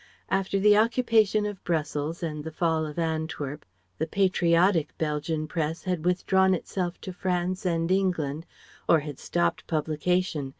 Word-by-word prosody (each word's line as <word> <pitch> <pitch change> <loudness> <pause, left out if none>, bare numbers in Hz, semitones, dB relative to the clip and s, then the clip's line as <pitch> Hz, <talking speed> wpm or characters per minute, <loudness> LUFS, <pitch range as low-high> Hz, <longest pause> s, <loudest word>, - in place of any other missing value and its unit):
After 195 0 +1
the 210 +1 +6
occupation 220 -2 +3
of 205 -2 -5
Brussels 155 0 -2
and 150 -2 -3
the 160 - -5
fall 160 -1 0
of 150 - -9
Antwerp, 160 -3 -3 0.4
the 160 - 0
"patriotic" 175 -2 +2
Belgian 155 0 -1
Press 160 +1 -3
had 180 -3 -2
withdrawn 190 +1 +3
itself 180 0 -4
to 185 - -6
France 180 +1 -1
and 165 0 0
England 170 -5 0 0.4
or 160 - +5
had 145 -2 -7
stopped 85 0 -1
publication. 155 -1 0
170 Hz, 140 wpm, -27 LUFS, 155-185 Hz, 0.4 s, the